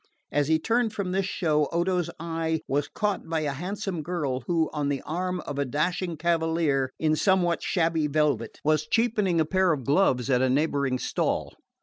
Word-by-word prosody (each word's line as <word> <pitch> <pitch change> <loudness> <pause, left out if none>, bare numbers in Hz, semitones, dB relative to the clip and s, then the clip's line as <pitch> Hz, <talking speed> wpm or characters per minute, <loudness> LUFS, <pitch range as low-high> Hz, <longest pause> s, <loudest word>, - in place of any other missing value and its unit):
As 145 -1 +1
he 160 0 +4
turned 225 +6 0
from 190 -3 -3
this 190 0 0
show 155 -6 +1
Odo's 175 0 0
eye 165 -1 -1
was 145 +1 0
caught 205 -5 -2
by 165 -1 0
a 150 -2 -1
handsome 185 +3 -4
girl 150 -6 -2
who, 165 -2 +2
on 145 -2 -1
the 140 -2 -2
arm 180 +3 -2
of 145 -1 -5
a - - +2
dashing 170 +5 -1
cavalier 160 -4 +1
in 155 -1 +2
somewhat 175 -1 +2
shabby 165 -4 +1
velvet, 145 -6 0
was 155 0 +2
cheapening 210 -5 +1
a 160 - +3
pair 185 +2 +2
of 140 -6 -2
gloves 140 -5 +2
at 125 -1 +3
a 130 - +3
neighbouring 140 -1 +1
stall. - - -1
160 Hz, 185 wpm, -26 LUFS, 145-180 Hz, -, he